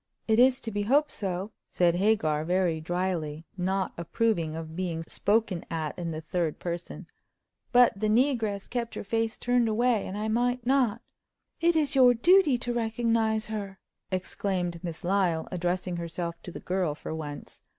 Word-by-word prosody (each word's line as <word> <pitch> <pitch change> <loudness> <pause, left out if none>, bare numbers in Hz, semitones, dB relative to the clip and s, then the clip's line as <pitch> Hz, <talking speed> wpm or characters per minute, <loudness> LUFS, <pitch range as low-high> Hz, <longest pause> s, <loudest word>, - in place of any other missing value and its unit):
"It 220 0 +3
is 255 +1 +5
to 225 - -4
be 205 0 -1
hoped 285 +8 +3
so," 190 +1 -3 0.2
said 175 -1 +3
Hagar, 180 -7 +2
very 175 -1 +1
dryly, 165 -3 -2
not 190 +1 -1
approving 170 -3 0
of 160 0 -7
being 170 -3 -2
spoken 205 0 0
at 160 -2 -3
in 170 -2 -4
the 160 -1 -4
third 165 -1 -2
person; 175 0 -5 0.7
"but 245 0 +6
the 215 - +1
negress 225 -4 +1
kept 235 -2 -3
her - - -4
face 225 +2 -1
turned 245 -2 +2
away, 230 0 +1
and 195 - -5
I 215 +1 -2
might 245 +2 0
not—" 245 -4 +2 0.6
"It 335 0 +3
is 305 -2 +2
your 250 -2 +6
duty 335 +1 +5
to 240 0 -3
recognize 225 -1 +1
her," 200 -3 -5 0.3
exclaimed 185 -2 -2
Miss 170 -3 -6
Lyle, 175 -3 +1
addressing 180 0 -2
herself 170 0 -4
to 180 - -8
the - - -7
girl 180 -5 -1
for 160 - -6
once. 150 -2 -7
195 Hz, 165 wpm, -28 LUFS, 170-230 Hz, 0.7 s, but